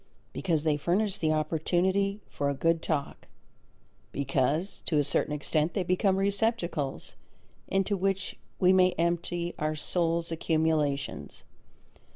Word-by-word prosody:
Because 165 Hz, -5 st, 0 dB
they 155 Hz, -2 st, +2 dB
furnish 190 Hz, +6 st, 0 dB
the 155 Hz, -1 st, +1 dB
opportunity 180 Hz, +6 st, +1 dB
for 140 Hz, 0 st, -2 dB
a 140 Hz, -, -1 dB
good 165 Hz, +3 st, +1 dB
talk, 145 Hz, -4 st, -3 dB, 0.8 s
because 140 Hz, +6 st, -1 dB
to 160 Hz, -, +2 dB
a 145 Hz, -, +4 dB
certain 145 Hz, +1 st, 0 dB
extent 150 Hz, +2 st, 0 dB
they 195 Hz, -, +1 dB
become 185 Hz, +2 st, +2 dB
receptacles 195 Hz, -, -1 dB, 0.5 s
into 195 Hz, +1 st, +1 dB
which 195 Hz, 0 st, -1 dB, 0.2 s
we 185 Hz, 0 st, +5 dB
may 185 Hz, -1 st, +5 dB
empty 170 Hz, +1 st, -1 dB
our 155 Hz, 0 st, -1 dB
soul's 170 Hz, +2 st, 0 dB
accumulations. 155 Hz, -4 st, -1 dB
170 Hz, 125 wpm, -29 LUFS, 155-190 Hz, 0.8 s, we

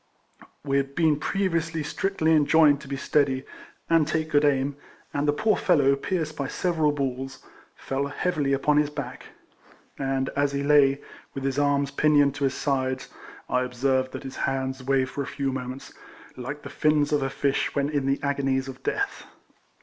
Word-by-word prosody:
We 140 Hz, -1 st, +1 dB
had 140 Hz, 0 st, -2 dB
been 155 Hz, -3 st, +3 dB
previously 165 Hz, -3 st, -1 dB
strictly 175 Hz, 0 st, 0 dB
enjoined 150 Hz, -1 st, +5 dB
to -, -, -11 dB
be 135 Hz, 0 st, -4 dB
steady, 135 Hz, -1 st, +1 dB, 0.4 s
and 165 Hz, -3 st, +3 dB
take 155 Hz, 0 st, -1 dB
good 145 Hz, 0 st, +4 dB
aim, 140 Hz, -1 st, +2 dB, 0.4 s
and 145 Hz, +1 st, 0 dB
the -, -, +5 dB
poor 210 Hz, +8 st, +2 dB
fellow, 140 Hz, -6 st, +3 dB
pierced 155 Hz, +1 st, -2 dB
by 140 Hz, -2 st, -3 dB
several 160 Hz, -3 st, +1 dB
balls, 135 Hz, -2 st, -4 dB, 0.3 s
fell 135 Hz, +1 st, -3 dB
heavily 145 Hz, -1 st, -1 dB
upon 145 Hz, +2 st, +2 dB
his 150 Hz, -1 st, +3 dB
back; 140 Hz, -4 st, -7 dB, 0.7 s
and 135 Hz, -1 st, -1 dB
as 140 Hz, 0 st, 0 dB
he 140 Hz, 0 st, -1 dB
lay, 140 Hz, -1 st, +4 dB, 0.3 s
with 135 Hz, -, -4 dB
his 135 Hz, +1 st, 0 dB
arms 140 Hz, -1 st, +1 dB
pinioned 145 Hz, -2 st, +3 dB
to 145 Hz, -1 st, -1 dB
his 135 Hz, -, 0 dB
sides, 130 Hz, -2 st, -1 dB, 0.4 s
I 125 Hz, -, +1 dB
observed 130 Hz, +1 st, 0 dB
that -, -, -6 dB
his 135 Hz, -, -8 dB
hands 130 Hz, -1 st, -2 dB
waved 135 Hz, 0 st, +1 dB
for 145 Hz, -, -3 dB
a 140 Hz, -, -4 dB
few 140 Hz, -1 st, -2 dB
moments, 130 Hz, 0 st, -6 dB, 0.4 s
like 145 Hz, +4 st, -6 dB
the -, -, -7 dB
fins 150 Hz, -1 st, +2 dB
of 145 Hz, -, +2 dB
a 135 Hz, -, 0 dB
fish 135 Hz, 0 st, -1 dB
when 140 Hz, -1 st, +1 dB
in 145 Hz, -2 st, -1 dB
the 135 Hz, +1 st, +1 dB
agonies 135 Hz, -2 st, 0 dB
of 135 Hz, 0 st, -9 dB
death. 400 Hz, -, -2 dB
140 Hz, 180 wpm, -25 LUFS, 135-150 Hz, 0.7 s, enjoined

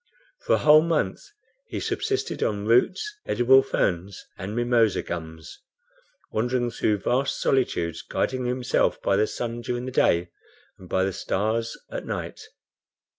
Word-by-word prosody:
For -, -, +4 dB
a -, -, +5 dB
whole 155 Hz, 0 st, +7 dB
month 165 Hz, -1 st, 0 dB, 0.5 s
he -, -, -4 dB
subsisted 400 Hz, -1 st, -2 dB
on 105 Hz, -1 st, -1 dB
roots, 185 Hz, -, +2 dB
edible 130 Hz, +2 st, +5 dB
ferns 95 Hz, -7 st, -2 dB
and 100 Hz, +3 st, -6 dB
mimosa 120 Hz, -3 st, +2 dB
gums, 80 Hz, -2 st, -7 dB, 0.7 s
wandering 120 Hz, +2 st, 0 dB
through 105 Hz, -2 st, +1 dB
vast 135 Hz, +3 st, 0 dB
solitudes, 85 Hz, -, 0 dB
guiding 130 Hz, -1 st, -2 dB
himself 125 Hz, 0 st, +1 dB
by 100 Hz, -, +2 dB
the 105 Hz, +2 st, +2 dB
sun 120 Hz, 0 st, -4 dB
during 120 Hz, +1 st, -3 dB
the 130 Hz, -, -5 dB
day 85 Hz, -8 st, +2 dB, 0.5 s
and 90 Hz, -, -13 dB
by 95 Hz, -, +1 dB
the 95 Hz, 0 st, -1 dB
stars 115 Hz, +5 st, -1 dB
at -, -, -5 dB
night. -, -, -5 dB
120 Hz, 140 wpm, -25 LUFS, 100-130 Hz, 0.7 s, whole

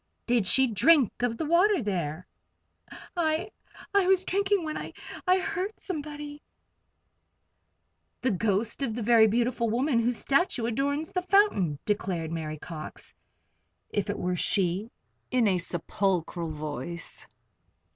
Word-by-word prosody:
"Did 235 Hz, -5 st, +2 dB
she 265 Hz, +6 st, +6 dB
drink 255 Hz, -, +3 dB
of 240 Hz, -2 st, 0 dB
the 320 Hz, -, -2 dB
water 365 Hz, +6 st, +4 dB
there?" 180 Hz, -, -3 dB, 0.9 s
"I 320 Hz, -1 st, 0 dB, 0.4 s
I 400 Hz, -2 st, +4 dB
was 380 Hz, -1 st, +4 dB
drinking 400 Hz, +1 st, +1 dB
it -, -, -6 dB
when 310 Hz, -, -3 dB
I -, -, -6 dB, 0.3 s
I 365 Hz, +1 st, +5 dB
heard 385 Hz, +2 st, -3 dB
somebody 295 Hz, -3 st, -6 dB, 0.9 s
" -, -, -49 dB
"The 255 Hz, -, +2 dB
ghost 210 Hz, +4 st, 0 dB
of 235 Hz, -5 st, -1 dB
the 235 Hz, -, -3 dB
very 225 Hz, 0 st, +6 dB
beautiful 235 Hz, +1 st, +1 dB
woman 245 Hz, +2 st, +1 dB
whose 235 Hz, 0 st, +1 dB
statue 275 Hz, -5 st, +1 dB
adorns 285 Hz, +6 st, -1 dB
the 365 Hz, -, -1 dB
fountain," 355 Hz, -, +3 dB
declared 185 Hz, -6 st, -1 dB
Mary 155 Hz, -2 st, -4 dB
Cox, 155 Hz, 0 st, -7 dB, 0.8 s
if 205 Hz, 0 st, -1 dB
it 205 Hz, -, -1 dB
were 180 Hz, 0 st, -1 dB
she, 190 Hz, +3 st, 0 dB, 0.4 s
in 250 Hz, -3 st, +3 dB
a 185 Hz, -2 st, +2 dB
sepulchral 175 Hz, -1 st, -1 dB
voice. 150 Hz, +1 st, -5 dB
235 Hz, 135 wpm, -28 LUFS, 185-310 Hz, 0.9 s, she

